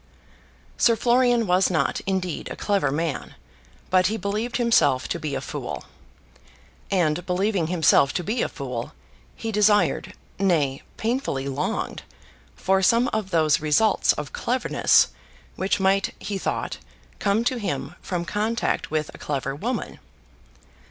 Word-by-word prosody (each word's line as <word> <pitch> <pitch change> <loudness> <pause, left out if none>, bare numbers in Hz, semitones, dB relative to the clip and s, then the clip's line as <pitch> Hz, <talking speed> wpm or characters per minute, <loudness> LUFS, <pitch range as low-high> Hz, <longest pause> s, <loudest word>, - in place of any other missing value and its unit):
Sir 230 - +4
Florian 240 0 +3
was 180 0 +3
not, 155 -6 0
indeed, 185 -3 -2
a - - -5
clever 200 -9 0
man; 155 +1 -3 0.6
but 185 0 +4
he 220 +3 -1
believed 210 +4 -2
himself 230 - +3
to 170 - -2
be 150 -3 -3
a - - -3
fool. - - -5 1.1
And 175 -3 +1
believing 185 -1 0
himself 160 -5 +4
to 180 - -2
be 220 +6 -1
a - - 0
fool, 125 -4 -5 0.4
he 225 - -4
desired, 210 0 +2 0.2
nay, 155 -9 +1 0.2
painfully 220 - -1
longed, 140 +2 -2 0.5
for 190 0 +1
some 235 +5 +4
of 215 -3 -2
those 155 -5 +3
results 170 +8 +3
of 150 -2 -6
cleverness 250 +1 +3 0.5
which 190 +2 0
might, 195 +1 +1
he 200 -2 -4
thought, - - -3 0.4
come 205 +3 +1
to 250 +1 0
him, 145 -7 -3
from 175 -2 -3
contact 215 +5 -1
with 155 -1 -2
a - - -12
clever 135 -2 -3
woman. 225 - -4
190 Hz, 140 wpm, -24 LUFS, 155-220 Hz, 1.1 s, Sir